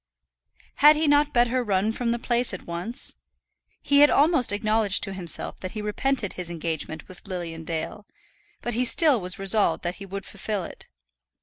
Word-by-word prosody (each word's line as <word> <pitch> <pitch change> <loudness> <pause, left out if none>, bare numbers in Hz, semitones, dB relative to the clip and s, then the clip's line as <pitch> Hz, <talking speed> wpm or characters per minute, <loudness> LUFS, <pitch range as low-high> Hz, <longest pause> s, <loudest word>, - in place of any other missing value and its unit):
Had 295 +2 +6
he 310 +1 -1
not 290 0 +3
better 245 0 +1
run 205 0 0
from 235 +1 -3
the 235 - 0
place 240 -3 0
at - - -12
once? 175 +10 -5 0.7
He 285 0 +3
had 290 0 +7
almost 295 -5 +3
acknowledged 215 -1 +1
to 195 - +1
himself 180 -4 +2
that 185 - -7
he 215 - -5
repented 210 +1 -2
his 180 -2 -2
engagement 160 -2 -5
with 185 +2 -13
Lilian 170 -4 -6
Dale, 165 +6 -5 0.6
but 240 - -3
he 245 +3 0
still 285 - +5
was 180 0 -2
resolved 195 +2 +2
that 175 +1 -4
he 195 - -8
would 195 +1 -7
fulfil 200 -1 -5
it. - - -10
210 Hz, 180 wpm, -24 LUFS, 180-245 Hz, 0.7 s, had